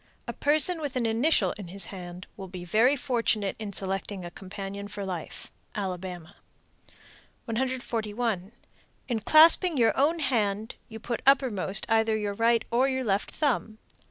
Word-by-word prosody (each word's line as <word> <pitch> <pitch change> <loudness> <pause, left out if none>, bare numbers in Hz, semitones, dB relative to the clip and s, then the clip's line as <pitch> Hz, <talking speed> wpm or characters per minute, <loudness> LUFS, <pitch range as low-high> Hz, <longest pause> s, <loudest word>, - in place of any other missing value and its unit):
A - - -4
person 310 +4 +2
with 285 -4 -4
an 245 -2 +1
initial 230 +8 +2
in 195 - -7
his 190 +1 -5
hand 180 -1 -8
will 195 -2 -8
be 180 -1 -8
very 230 +9 +3
fortunate 230 -7 -1
in 210 -2 -5
selecting 195 0 -4
a 175 - -8
companion 195 +1 -7
for 205 -1 -6
life. 180 -4 -7 0.2
Alabama. 185 -3 -6 1.1
141. 230 -4 -2 0.6
In 235 -3 -1
clasping 320 - +5
your 230 -2 +3
own 300 +5 +2
hand, 220 -7 -1 0.2
you 225 0 -9
put 235 +1 -4
uppermost 225 -8 +5
either 225 0 +2
your 205 -1 -3
right 230 +2 +2
or 250 +3 +3
your 260 -1 -2
left 200 -3 0
thumb. 240 -7 -1
220 Hz, 150 wpm, -27 LUFS, 195-255 Hz, 1.1 s, clasping